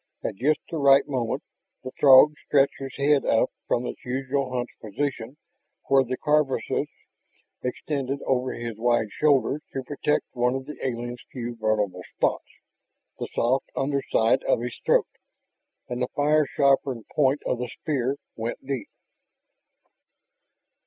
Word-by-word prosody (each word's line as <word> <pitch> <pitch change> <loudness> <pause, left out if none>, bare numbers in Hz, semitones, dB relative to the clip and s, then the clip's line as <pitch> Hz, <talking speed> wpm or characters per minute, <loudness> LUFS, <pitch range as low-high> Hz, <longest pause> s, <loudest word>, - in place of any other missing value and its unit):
At - - -2
just 145 +9 +1
the 165 - -2
right 140 0 +5
moment 125 -5 -2 0.4
the 130 - -6
Throg 140 +2 +8
stretched 140 -1 +3
his 135 -1 -7
head 140 0 +3
up 115 - +2 0.2
from 120 - +1
the - - -3
usual 130 +1 -2
hunched 125 -1 -4
position 120 +3 -4 0.5
where 135 -1 +5
the 130 0 -4
carapace 150 -3 +1 0.7
extended 135 +1 -3
over 130 -1 +1
his 115 -2 -5
wide 120 -2 +2
shoulders 145 +1 +2
to 135 - -3
protect 145 +2 -1
one 125 +1 +1
of 135 0 -4
the 150 - -7
alien's 120 -1 -3
few 120 -2 -5
vulnerable 105 -5 0
spots, - - 0 0.7
the - - -3
soft 130 +3 +1
underside 135 -3 +1
of - - +2
his 120 0 -4
throat. - - +4 0.8
And 125 0 -4
the 125 - +1
fire 150 +1 +3
sharpened 135 -4 +1
point 140 -1 +2
of 125 - -1
the 125 -1 -3
spear 140 -3 -1 0.2
went 115 +3 -5
deep. 135 -3 -4
130 Hz, 140 wpm, -25 LUFS, 120-140 Hz, 0.8 s, Throg